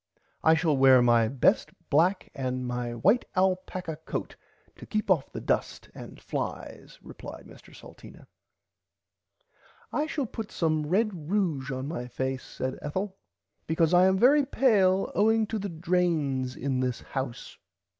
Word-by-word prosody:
I 160 0 +6
shall 160 -2 +1
wear 130 -1 +6
my 120 -2 +4
best 130 +2 +2 0.2
black 180 +6 +2
and 130 -1 -3
my 120 -1 -3
white 205 - +3
alpacka 185 -3 -1
coat - - -5 0.4
to - - -11
keep 215 -1 -1
off - - +1
the - - -6
dust - - -2
and - - -11
flies - - -6
replied - - -10
Mr - - -16
Salteena. - - -14 1.7
I 300 +1 0
shall 295 -3 -2
put 220 -1 -7
some 155 -2 0
red 210 +7 +2
ruge 165 -5 -2
on 130 0 -4
my 125 -6 -5
face 130 +1 -3
said 130 0 -5
Ethel 185 +6 -3 0.5
because 160 +1 +2
I 180 +1 +6
am 190 0 +3
very 280 +7 +5
pale 200 -9 +2
owing 220 +1 +3
to 220 +1 -3
the 200 0 -4
drains 160 -7 0
in 135 -1 -2
this 125 -2 -2
house. 130 -3 -6
160 Hz, 145 wpm, -27 LUFS, 130-195 Hz, 1.7 s, I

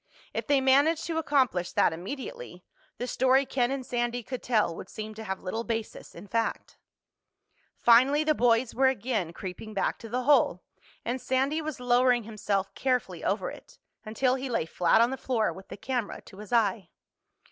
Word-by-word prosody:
If - - -3
they 285 -2 +3
managed 285 +5 +3
to 325 -2 -1
accomplish 255 - +1
that - - +3
immediately, 280 - -7 0.3
the 245 - -3
story 260 +2 +3
Ken 245 -2 0
and 270 -1 -3
Sandy 240 0 -2
could 255 +1 -6
tell 215 -8 +1
would 190 - -9
seem 215 0 -7
to 220 +1 -8
have 190 -3 -5
little 220 +5 -3
basis 225 -2 -5
in 170 - -10
fact. 230 +2 -2 1.0
Finally 260 +6 +5
the 310 0 +3
boys 240 -2 +2
were 265 +1 +3
again 230 -8 -1
creeping 190 +4 -8
back 195 - 0
to 225 - -9
the 250 +3 -1
hole 250 -10 +3 0.4
and 245 +2 -2
Sandy 270 +5 0
was 310 -3 -5
lowering 245 0 +3
himself 205 -3 -2
carefully 255 -2 -1
over - - -1
it, - - -14 0.3
until 250 +4 +1
he 265 0 -3
lay 230 -9 0
flat 175 +6 +3
on 235 +2 +3
the 265 - -3
floor 240 -4 0
with 190 0 -12
the - - -9
camera 245 0 -3
to 190 - -15
his 210 +1 -10
eye. 210 -6 +1
240 Hz, 180 wpm, -28 LUFS, 215-265 Hz, 1.0 s, Finally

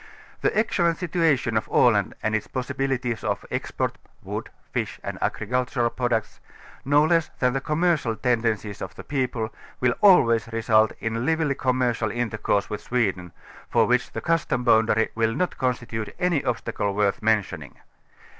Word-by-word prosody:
The - - +1
excellent 175 -6 +2
situa 165 -4 +2
tion 115 -2 -3
of 110 -1 0
Aland 105 -5 +3
and 110 - 0
its 110 - -2
possibilities 130 -2 -2
of - - -2
export - - -2 0.2
(wood, - - -5 0.2
fish - - -2
and - - -5
agricultural 120 +1 0
products) 120 -3 -1 0.4
no 145 +2 +4
less 165 -1 +2
than 125 -1 +2
the 135 - -1
commercial 150 -6 +1
tenden 115 -1 +1
cies 105 -1 -9
of - - -6
the - - -9
people, 125 -5 -2 0.3
will 125 -1 +2
always 115 - +5
result 110 -1 +3
in 115 +1 -2
lively 160 0 +1
commercial 125 -4 0
intercourse 110 -3 -1
with 105 - -5
Sweden, 95 -8 -1 0.4
for - - +3
which - - +1
the - - -5
custom 165 -7 0
boundary 110 -1 +3
will 115 0 0
not 180 +4 -2
constitute 120 -3 -2
any 175 -5 +1
obstacle 105 -4 -2
worth 100 -1 +1
mentioning. 110 -2 0
120 Hz, 155 wpm, -24 LUFS, 110-140 Hz, 0.4 s, always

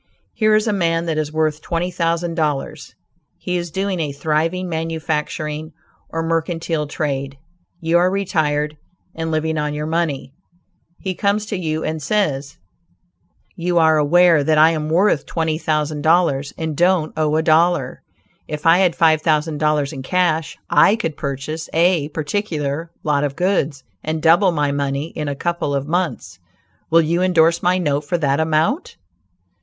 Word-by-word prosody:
Here 215 -1 +3
is 215 - +2
a 215 - 0
man 165 -3 0
that 160 -2 -1
is 150 -1 -2
worth 155 -1 0
twenty 175 +3 -2
thousand 170 -1 -1
dollars; 150 -4 -3 0.4
he 180 - -3
is 175 -1 -2
doing 190 +2 -2
a 150 -3 -1
thriving 160 +5 -1
manufacturing 160 -1 -3 0.4
or 165 0 -3
mercantile 165 -1 -1
trade; 140 -2 -3 0.4
you 165 +1 +2
are 180 +1 +3
retired 150 -6 -1 0.4
and 160 0 -4
living 160 0 -1
on 150 0 -2
your 150 0 -3
money; 155 -4 -2 0.7
he 190 - -3
comes 200 +3 0
to 210 - -4
you 160 -4 -2
and 155 0 -3
says: 145 -6 -1 1.0
"You 175 0 -1
are 160 -1 +5
aware 165 +1 +4
that 155 +2 +2
I 155 +2 +6
am 155 -1 -3
worth 175 -1 +2
twenty 160 -2 -1
thousand 150 -2 -1
dollars, 155 -4 +2
and 160 -2 -3
don't 175 -1 +2
owe 155 -1 +1
a 160 - +1
dollar; 170 +2 +2 0.5
if 150 -1 -6
I 165 +2 +6
had 180 -3 +3
five 160 -3 +3
thousand 155 -1 0
dollars 150 -1 +1
in 135 - -6
cash, 160 +1 0
I 205 - +5
could 165 -10 -3
purchase 140 +3 -5
a 170 -2 +3
particular 155 -1 -3
lot 150 -2 +1
of 140 -1 -2
goods 160 -7 0 0.2
and 155 +1 -2
double 170 +5 +4
my 150 -3 0
money 140 +2 -2
in 150 -3 -5
a 140 - -2
couple 170 -2 -2
of 140 +1 -2
months; 160 - -2 0.5
will 165 0 +5
you 170 +3 0
indorse 170 -2 +3
my 180 +1 +2
note 145 -5 0
for 160 +4 -1
that 140 -2 +1
amount?" 160 - 0
160 Hz, 165 wpm, -20 LUFS, 150-175 Hz, 1.0 s, I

